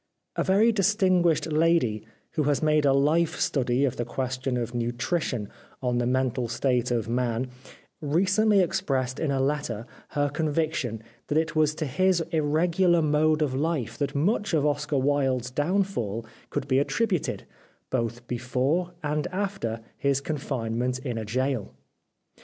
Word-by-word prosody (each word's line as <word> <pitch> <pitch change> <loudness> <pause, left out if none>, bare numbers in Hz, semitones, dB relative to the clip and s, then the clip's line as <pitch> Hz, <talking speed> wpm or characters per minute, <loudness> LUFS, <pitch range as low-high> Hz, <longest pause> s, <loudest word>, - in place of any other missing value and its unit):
A - - +1
very 205 +5 +4
distinguished 185 -6 +3
lady 155 -10 +2 0.3
who 155 -3 0
has 145 +1 +1
made 150 -1 +3
a 140 - +5
life 155 +4 +2
study 130 0 +1
of 130 - -2
the 120 - 0
question 130 +1 -2
of 120 0 -3
nutrition 120 - -1 0.3
on 125 -2 0
the 120 - 0
mental 130 -1 0
state 125 +1 0
of 115 -3 0
man 120 +1 -1 0.5
recently 195 +7 +3
expressed 135 -8 -1
in 160 - 0
a 135 -1 +1
letter 135 -5 -1 0.3
her 145 0 +3
con 155 +1 -1
viction 145 -8 -1 0.3
that 150 - 0
it 160 0 0
was 155 -1 +3
to 155 - -2
his 185 +6 +2
irregular 165 +3 +2
mode 155 +1 +3
of 140 -4 -1
life 145 -3 -1
that 145 -1 -1
much 195 +5 +1
of 150 -2 +2
Oscar 145 0 0
Wilde's 130 -2 +1
downfall 145 - -1 0.2
could - - -3
be 130 0 +3
attributed, 185 +3 -1 0.5
both 120 -1 -2
before 130 +9 -1
and 150 0 -1
after 185 - -3 0.2
his 140 -1 +2
confinement 125 -4 -2
in 125 -3 -4
a 110 - -4
gaol. 130 0 -1
145 Hz, 150 wpm, -26 LUFS, 125-165 Hz, 0.5 s, a